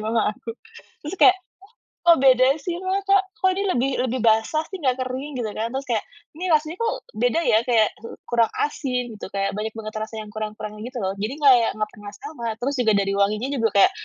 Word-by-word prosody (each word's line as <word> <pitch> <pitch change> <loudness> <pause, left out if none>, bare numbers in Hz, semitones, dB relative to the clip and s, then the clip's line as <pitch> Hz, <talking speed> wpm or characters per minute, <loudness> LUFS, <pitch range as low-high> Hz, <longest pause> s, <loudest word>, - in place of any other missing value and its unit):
mama 220 0 0
aku. 230 - -17 0.6
Terus 345 +6 -5
kayak, 380 - +7 0.7
"Kok 335 -1 +8
beda 255 -1 +6 0.2
sih 345 +1 -3
Mah? 375 +1 -1
Kok 395 0 +4 0.2
kok 375 - +5
ini 400 - 0
lebih 260 +3 +1
lebih 255 0 -2
basah 225 +7 +3
sih, 380 - -6
nggak 260 -4 +1
kering?" 265 +3 -5
gitu 220 - -2
kan. 230 +2 -2
Terus 270 0 -3
kayak, 220 -3 0 0.3
ini 360 - -4
rasanya 310 +3 0
kok 455 - +1 0.2
beda 245 +8 +2
ya, 220 - +4
kayak 225 -4 +4 0.4
kurang 235 -2 +3
asin, 260 -4 -1 0.2
gitu, - - -6
kayak 195 0 0
banyak 220 +1 -3
banget 215 -1 -7
rasa 220 +1 -6
yang 215 - -11
kurang-kurang 215 0 -6
gitu 250 0 -6
lho. 190 - 0
Jadi 215 +7 -3
kayak 250 -5 +6
nggak 215 0 -2
pernah 205 -1 -10
sama, 305 - -6 0.2
terus 280 +2 0
juga 225 -3 +3
dari 195 0 +1
wanginya 210 +6 +1
juga 225 -1 +3
kayak, - - +7
240 Hz, 210 wpm, -23 LUFS, 215-285 Hz, 0.7 s, Kok